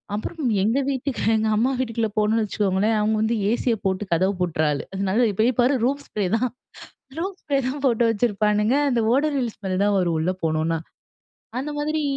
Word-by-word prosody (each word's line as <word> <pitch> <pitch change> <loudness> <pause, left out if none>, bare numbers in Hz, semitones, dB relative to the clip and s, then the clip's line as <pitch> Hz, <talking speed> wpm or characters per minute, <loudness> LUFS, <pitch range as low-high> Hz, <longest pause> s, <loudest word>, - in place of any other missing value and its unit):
அப்புறம் 315 +9 -5 0.2
எங்க 230 +6 +2
வீட்டுக்கு 270 0 -2
எங்க 220 0 +1
அம்மா 245 +4 +2
வீட்டுக்குள்ள 230 -3 -1
போனோம்னு 215 +1 +2
வச்சுக்கோங்களேன் 205 +1 +1
அவுங்க 215 +1 +1
வந்து 225 +1 +1 0.2
ஏசி 245 - -2
ய - - +1
போட்டு 190 +1 0
கதவ 185 +4 +2
பூட்ற 165 -3 0
ஆளு. 145 - -2 0.3
நல்லா 230 +6 +2
இப்ப 200 - -11
போய் 245 0 +1
பாரு! 255 +4 +3
ரூம் 280 +2 0
ஸ்ப்ரே 205 -3 -2
தான் 250 +1 0 0.7
ரூம் 380 +3 -3
ஸ்ப்ரே 280 -2 0
தான் 280 +1 -4
போட்டு 235 -1 +2
வச்சிருப்பானுங்க 210 +1 +1 0.2
அந்த 240 -2 +1
ஓடோனில்ஸ் 275 -5 0
ஸ்மெல் 190 -1 -1
தான் 205 -1 +2
வரும் 170 -3 +1
உள்ள 165 +4 0
போனோனா, 160 +1 0 0.8
அந்த 290 +3 -3
மாதிரி 305 +1 -1
220 Hz, 185 wpm, -23 LUFS, 200-260 Hz, 0.8 s, பாரு